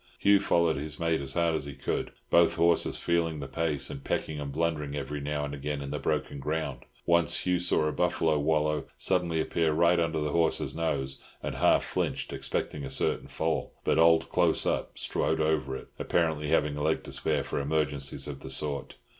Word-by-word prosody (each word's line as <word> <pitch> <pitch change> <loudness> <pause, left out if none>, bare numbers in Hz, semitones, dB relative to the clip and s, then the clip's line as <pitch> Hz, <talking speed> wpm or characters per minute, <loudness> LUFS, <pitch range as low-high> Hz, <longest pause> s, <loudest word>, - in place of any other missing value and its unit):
Hugh 100 0 +5
followed 85 -5 +2
his 75 +1 -4
mate 80 -2 +1
as 65 -1 -3
hard 85 -1 +2
as 80 -3 -1
he 70 -2 -7
could, 70 - -3 0.2
both 85 0 +5
horses 85 0 +3
feeling 85 -2 0
the 70 - -5
pace, 75 0 -1
and 70 - -8
pecking 75 -1 -2
and 70 -1 -4
blundering 75 -2 -1
every 70 0 -4
now 75 0 -2
and 70 - -6
again 70 +1 -3
in 70 0 -6
the 75 - -2
broken 70 - -2
ground. 75 -3 -3 0.2
Once 85 -2 +3
Hugh 90 -1 +2
saw 85 -3 +2
a 75 - +1
buffalo 80 -1 +1
wallow 75 0 +1
suddenly 90 -3 +1
appear 80 0 +1
right 85 +2 +4
under 80 -1 0
his 75 - -1
horse's 85 0 +1
nose, 70 -5 -1 0.2
and - - -3
half - - +3
flinched, - - -2
expecting 75 - -3
a 65 - -5
certain - - 0
fall; 80 0 -2
but - - +2
old 80 0 +5
"Close - - +2
Up" - - -1
strode 80 - 0
over 75 -4 0
it, - - -12
apparently 80 -3 0
having 75 -1 +2
a - - -3
leg 80 +2 +1
to - - -8
spare - - 0
for - - -3
emergencies 70 -2 -1
of 70 -2 -6
the 65 - -9
sort. 70 +1 0
75 Hz, 200 wpm, -28 LUFS, 70-80 Hz, 0.2 s, Hugh